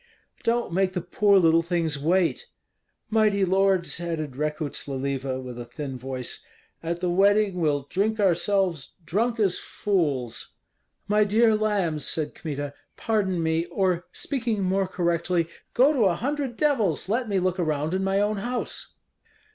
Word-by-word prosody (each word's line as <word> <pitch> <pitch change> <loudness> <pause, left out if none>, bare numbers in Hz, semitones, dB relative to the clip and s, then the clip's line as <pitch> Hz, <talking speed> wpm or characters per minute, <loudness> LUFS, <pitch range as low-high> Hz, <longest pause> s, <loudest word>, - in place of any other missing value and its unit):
"Don't 235 -5 0
make 185 +1 +1
the 180 - -2
poor 200 +3 +3
little 165 -2 +5
things 165 -3 -1
wait!" 180 - +1 0.6
"Mighty 210 -3 +3
lords," 190 -2 +2
added 160 -5 -4
Rekuts 150 +1 -3
Leliva, 135 -1 -2
with 125 -2 -7
a 120 - -6
thin 130 +3 -6
voice, 130 0 -5 0.4
"at 170 +1 -3
the 180 - 0
wedding 200 0 +3
we'll 145 -3 +1
drink 215 +6 0
ourselves 180 -3 +1
drunk 230 +7 0
as 195 -4 +2
fools." 140 - -2 0.5
"My 210 +1 +4
dear 220 +2 +4
lambs," 200 -8 0
said 155 -2 -1
Kmita, 145 -3 -5 0.2
"pardon 190 -6 0
me, 160 +1 +1
or, 180 -1 0
speaking 230 -7 -2
more 190 +1 +1
correctly, 170 -1 0 0.3
go 270 +5 +5
to 245 -7 +3
a 180 -3 +3
hundred 270 - -2
devils, 230 - +1
let 230 +3 0
me 200 - +1
look 185 0 0
around 155 -1 0
in 190 +1 0
my 195 +1 +1
own 210 +1 +1
house." 245 +5 -4
180 Hz, 150 wpm, -25 LUFS, 160-205 Hz, 0.6 s, little